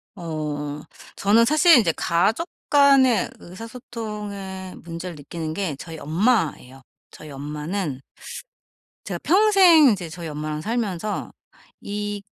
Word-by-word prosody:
어 150 -3 -5 0.3
저는 215 +4 +4
사실 310 +2 +6
이제 195 -8 +2
가족 220 - +1 0.2
간의 275 -4 +5
의사소통의 205 -3 -8
문제를 170 0 -7
느끼는 155 +2 -6
게 180 -7 -3
저희 165 0 -8
엄마예요. 160 - 0 0.3
저희 155 - -12
엄마는 150 +1 -4 1.0
제가 - - -4
평생 370 -6 +6
이제 185 -6 -2
저희 165 0 -7
엄마랑 150 0 -4
살면서 215 -1 -3 0.5
이 205 0 -4
190 Hz, 240 characters per minute, -23 LUFS, 155-230 Hz, 1.0 s, 사실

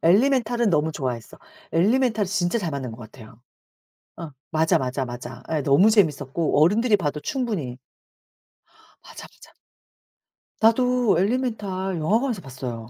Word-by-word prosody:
엘리멘탈은 235 +4 +3
너무 160 0 +1
좋아했어. 125 -6 -5 0.3
엘리멘탈은 220 +4 +2
진짜 185 +3 0
잘 175 -6 -3
만든 135 -4 -4
것 115 - -11
같아요. 110 0 -14 0.8
어 165 -3 -7 0.2
맞아, 160 0 +2
맞아, 130 +1 -2
맞아. 120 0 -8
예 150 -3 0
너무 155 +11 +4
재밌었고 155 - +1
어른들이 210 +5 +3
봐도 150 -4 -3
충분히 180 - -3 1.3
맞아, - - -11
맞아. - - -19 1.1
나도 245 -2 +3
엘리멘탈 195 -4 -1
영화관에서 220 - 0
봤어요. 125 -4 -7
175 Hz, 305 characters per minute, -23 LUFS, 135-220 Hz, 1.3 s, 너무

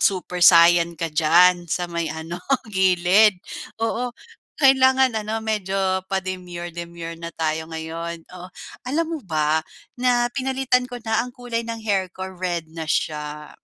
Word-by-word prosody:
Super 180 -2 0
Saiyan 170 -1 +6
ka 165 -1 -4
diyan, 175 +3 +4
sa 175 +3 -1
may 170 -1 -3
ano 160 +3 -6 0.3
gilid. 190 +2 +4 0.5
Oo, 245 +2 -1 0.5
kailangan 265 -3 +4
ano 220 +1 -3
medyo 210 -3 -2 0.3
pa-demure-demure 175 -3 -5
na 170 - -5
tayo 160 0 -2
ngayon. 165 +1 -6
Oh, 180 0 -9 0.4
alam 320 +5 0
mo 325 - -3
ba, 155 -1 +1 0.4
na 245 -1 +2
pinalitan 260 -1 0
ko 250 - -8
na 220 0 +1
ang 250 - -12
kulay 245 -2 -3
ng 230 -1 -5
hair 195 -3 +1
ko, 190 - -5
red 175 -3 -3
na 165 -1 -6
siya, 150 -1 -2
180 Hz, 140 wpm, -22 LUFS, 165-225 Hz, 0.5 s, Saiyan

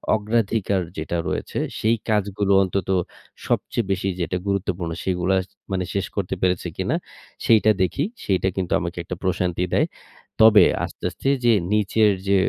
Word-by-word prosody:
অগ্রাধিকার 105 -3 0 0.2
যেটা 80 +2 -2
রয়েছে, - - -3 0.2
সেই 110 +2 +3
কাজগুলো 100 -1 0
অন্তত 95 -1 -2 0.6
সবচেয়ে 120 - 0
বেশি 95 0 -1
যেটা 90 +1 -1
গুরুত্বপূর্ণ 95 -3 -1
সেগুলা 95 0 +1 0.4
মানে 95 -1 0
শেষ 100 -1 0
করতে 95 -2 -2
পেরেছে 90 -1 +1
কিনা? - - 0 0.5
সেইটা 110 -1 +5
দেখি। 95 +10 +1 0.2
সেইটা 95 -1 +1
কিন্তু 90 -2 -2
আমাকে 85 0 -5
একটা 90 - -5
প্রশান্তি 90 -1 0
দেয়। - - +3 0.5
তবে, 110 -1 +8 0.2
আস্তে, - - -7
আস্তে - - -6 0.2
যে 120 - +6 0.2
নিচের 105 0 +3 0.2
যে 100 - +4
95 Hz, 145 wpm, -23 LUFS, 90-105 Hz, 0.6 s, তবে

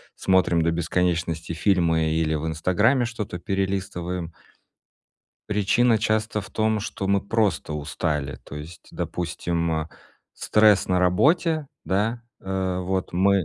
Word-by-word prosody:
смотрим 95 -3 +2
до 85 - +2
бесконечности 85 -1 -1
фильмы 80 -3 +2
или 80 -1 +1
в 75 +2 -3
"Инстаграме" 105 - +2
что-то 105 -6 -5
перелистываем 90 -3 -3 1.2
причина 105 +3 +3
часто 110 0 0
в 100 - -11
том, 110 -1 +1
что 95 -1 -4
мы 100 0 +3
просто 105 -6 0
устали, 75 -1 -2
то - - -10
есть, 80 +3 -10
допустим, 85 -1 -2
э, 80 - -10 0.5
стресс 105 -2 +4
на 90 0 +2
работе, 155 - +2 0.2
да, 110 +5 0 0.2
э, 95 -1 -2
вот, 95 0 -2
мы 95 0 +3
95 Hz, 125 wpm, -24 LUFS, 85-105 Hz, 1.2 s, стресс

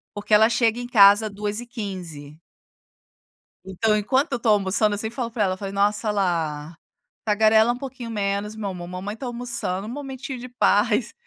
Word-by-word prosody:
porque 205 +1 -3
ela 220 +2 +6
chega 235 0 +1
em 245 - -5
casa 210 -1 +6
14:15. 200 - -6 1.3
Então, 215 +3 +1
enquanto 265 +8 0
eu - - +1
estou 225 -2 +1
almoçando 205 +1 +2
eu - - -2
sempre 220 +1 -4
falo 240 -3 -3
para 220 -3 0
ela, 185 -1 -1
falei: 195 0 -6
"Nossa, 210 +2 +1
Lá, 165 -5 -2 0.5
tagarela 220 +2 +4
um - - -7
pouquinho 255 -3 -7
menos, 205 0 -2
meu 205 -2 -4
amor! 175 -2 -7
Mamãe 185 +4 -6
está 255 - -8
almoçando, 235 -5 -4
um - - -6
momentinho 265 -1 -6
de 250 - -8
paz". 225 0 +1
210 Hz, 170 wpm, -23 LUFS, 200-235 Hz, 1.3 s, ela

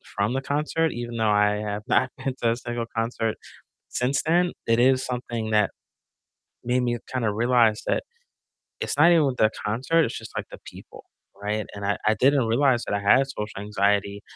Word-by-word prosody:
from 105 +4 0
the 135 - -1
concert, 155 +2 0
even 120 -1 -5
though 110 -1 +1
I 105 0 +3
have 105 0 -4
not 130 - +2
been 130 -1 -3
to 115 -1 +3
a - - 0
single 120 -1 -4
concert 115 -1 -1 0.5
since 135 +3 0
then, 175 +2 +2
it 115 0 +2
is 130 +1 +4
something 120 -3 -4
that 105 -2 +3 0.9
made 125 +1 +1
me 120 -1 -1
kinda 115 -5 0
realize 115 -1 +2
that - - 0 0.8
it's - - -2
not 170 - +6
even 160 -4 +4
with 130 -2 -1
the 110 - +4
concert, 135 +10 +1
it's - - -4
just, - - -11
like, - - -3
the - - -11
people, - - -13 0.4
right? 105 +1 -2
And 100 0 -7
I 100 - 0
I 110 - +4
didn't 135 -1 +3
realize 120 +1 +2
that - - -2
I 100 - 0
had 130 +7 +4
social 105 -6 -6
anxiety 100 0 0
120 Hz, 190 wpm, -24 LUFS, 105-130 Hz, 0.9 s, not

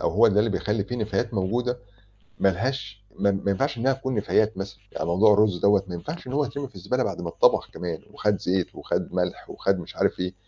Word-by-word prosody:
أو - - +1
هو 115 +5 +5
ده 105 0 +2
اللي 110 +2 +3
بيخلّي 105 0 -1
في 125 +4 -4
نفايات 110 +1 -1
موجودة 120 +6 0 0.6
مالهاش 100 +1 -1
ما 100 - +3
ما 100 0 0
ينفعش 120 +5 0
إنها 135 +3 +3
تكون 130 -1 -3
نفايات 105 0 +2
مثلًا. 100 +1 -6
يعني 80 - -3
موضوع 100 +5 +5
الرز 105 -3 +3
دوّة، 100 +1 +4
ما 90 - -5
ينفعش 150 - -6
إن 125 - -6
هو 145 +2 +2
يترمي 140 +1 -5
في - - -27
الزبالة 100 +8 -1
بعد - - -3
ما 85 - -3
اتطبخ - - +3
كمان، 85 -3 -5
وخَد 105 -2 0
زيت 90 -1 0
وخَد - - -3
مَلح، - - -2
وخَد 95 -1 0
مش 85 - -9
عارف - - +1
إيه. 90 +1 -2
105 Hz, 225 wpm, -25 LUFS, 95-120 Hz, 0.6 s, هو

